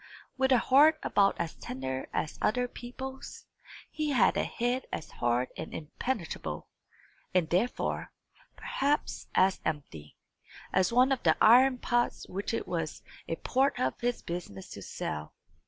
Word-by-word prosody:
With 265 0 +2
a 255 - +7
heart 295 +6 +6
about 200 -1 +3
as 170 -2 -2
tender 130 0 -5
as 155 - -3
other 245 +3 +2
people's, 260 +2 -8 0.5
he 305 -1 -2
had 250 -8 +4
a - - +1
head 245 +2 -1
as 155 - -5
hard 120 +1 0
and - - -6
impenetrable, 170 - -4 0.7
and 180 -3 +3
therefore, 205 +8 0 0.4
perhaps, 285 +2 -1
as 190 0 +4
empty, 80 - -5 0.6
as 185 +2 +3
one 250 +3 +5
of 265 - +1
the - - +3
iron 255 +3 +7
pots 240 0 0
which 195 +2 -3
it 230 - -2
was 165 -3 -3 0.2
a 165 - -1
part 265 +9 +1
of 130 0 -1
his 245 0 -1
business 170 - -6
to - - -8
sell. 75 0 -5
215 Hz, 145 wpm, -30 LUFS, 160-255 Hz, 0.7 s, a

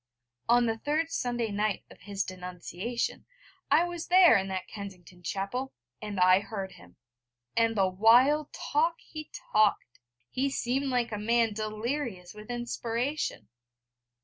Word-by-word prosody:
On 240 0 +5
the 225 -1 -1
third 315 +5 0
Sunday 240 -5 -1
night 205 0 -1
of - - -15
his 200 0 -2
denunciation 180 +5 -4 0.4
I - - +5
was 350 -1 -4
there 360 -6 +7
in 195 -2 +1
that 190 -1 -4
Kensington 190 -4 -10
chapel, 200 +9 -3 0.3
and 205 -2 -4
I 185 +1 +6
heard 200 -2 -5
him. 90 - -16 0.6
And 230 0 +3
the 190 -1 +4
wild 245 +10 +4
talk 325 +3 0
he 310 -2 -9 0.2
talked! 210 - +2 0.3
He 270 +2 0
seemed 270 +1 -1
like 245 -3 0
a 210 - -3
man 230 +1 +2
delirious 215 -2 -3
with 210 +1 -12
inspiration. 240 - -2
225 Hz, 140 wpm, -29 LUFS, 195-255 Hz, 0.6 s, there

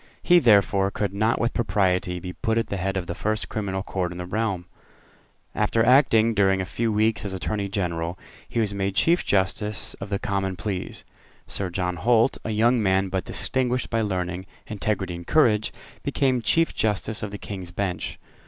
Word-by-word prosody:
He, 175 0 +6
therefore, 100 - +4
could 100 -1 -2
not 110 +3 +1
with 120 0 0
propriety 90 -5 +1
be 90 +1 -6
put 110 +4 -1
at 115 - 0
the 100 - -2
head 95 +1 -1
of 90 - -2
the 85 - -4
first 110 -3 -2
criminal 95 -3 -3
court 90 -4 -2
in 90 - -7
the 90 - -5
realm. 95 -2 -2 0.9
After 110 +2 +2
acting 115 -3 +5
during 95 -2 +3
a 95 - -1
few 115 +6 -1
weeks 110 +1 +1
as 100 -2 -4
Attorney 100 +2 -2
General, 85 -3 -2 0.3
he - - -1
was 105 -3 0
made 100 -1 -2
Chief 170 +1 +3
Justice 100 +2 +1
of 100 - -5
the 100 - 0
Common 95 -1 -2
Pleas. 95 0 -4 0.4
Sir 95 -2 -3
John 90 0 -2
Holt, 115 +7 +3
a - - -4
young 115 +3 +3
man, 95 -1 +2
but 95 0 -2
distinguished 125 -1 -1
by 115 -1 +1
learning, 90 -2 -2 0.2
integrity, 100 -3 -2
and 85 0 -8
courage, 110 -9 +3 0.3
became 130 -3 +1
Chief 165 +7 +2
Justice 110 0 -1
of 105 - -3
the 100 - -6
King's 95 -3 -7
Bench. 90 0 -3
100 Hz, 185 wpm, -25 LUFS, 95-110 Hz, 0.9 s, He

